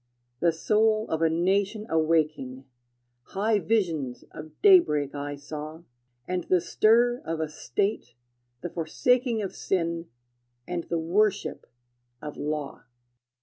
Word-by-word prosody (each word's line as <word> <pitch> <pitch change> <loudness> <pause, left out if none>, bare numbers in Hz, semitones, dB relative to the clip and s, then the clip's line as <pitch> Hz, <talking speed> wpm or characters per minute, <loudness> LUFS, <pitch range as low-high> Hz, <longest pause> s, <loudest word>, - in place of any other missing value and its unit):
The 170 - +3
soul 215 +6 +2
of 160 0 -1
a 165 - +4
nation 195 +6 0
awaking, 155 -5 0 0.7
High 210 +1 +2
visions 165 - -1
of 155 0 -11
daybreak 150 - +5
I 145 0 -4
saw, 155 +3 -8 0.4
And 180 -1 -2
the 185 - +3
stir 240 +7 +3
of 165 0 -3
a 160 - -1
state, 150 - -2 0.5
the 175 - -5
forsaking 235 - +1
Of 195 - -5
sin, 170 -2 -1 0.6
and 175 -2 -3
the 170 - -2
worship 190 +6 0 0.5
of 150 +2 -7
law. 150 -1 -4
170 Hz, 120 wpm, -27 LUFS, 155-210 Hz, 0.7 s, daybreak